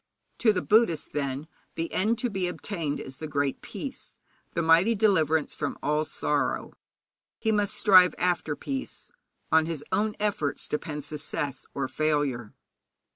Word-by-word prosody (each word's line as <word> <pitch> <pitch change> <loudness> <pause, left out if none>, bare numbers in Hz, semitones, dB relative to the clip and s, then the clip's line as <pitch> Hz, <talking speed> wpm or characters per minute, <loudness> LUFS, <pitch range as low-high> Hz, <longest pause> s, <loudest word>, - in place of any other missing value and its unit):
To 225 - +5
the 180 -3 -1
Buddhist, 210 -8 +3
then, 140 0 -2 0.3
the 165 0 -3
end 220 +5 +2
to 245 - -1
be 190 -2 -1
obtained 170 -5 -3
is 130 0 -8
the 155 - -5
Great 140 -2 -1
Peace, - - -7 0.4
the 170 - +1
mighty 170 +8 +5
deliverance 160 -8 +2
from 145 - -3
all 150 +1 +1
sorrow. - - -1 0.6
He 220 - 0
must 205 -2 +1
strive 185 -3 +6
after 175 -4 0
peace; 270 - -5 0.4
on 160 0 +4
his 155 -3 -4
own 210 +3 +1
efforts 200 -9 -1
depends 150 -1 -4
success 145 -1 -3
or 140 -1 -1
failure. 145 -7 -1
160 Hz, 145 wpm, -27 LUFS, 145-200 Hz, 0.6 s, strive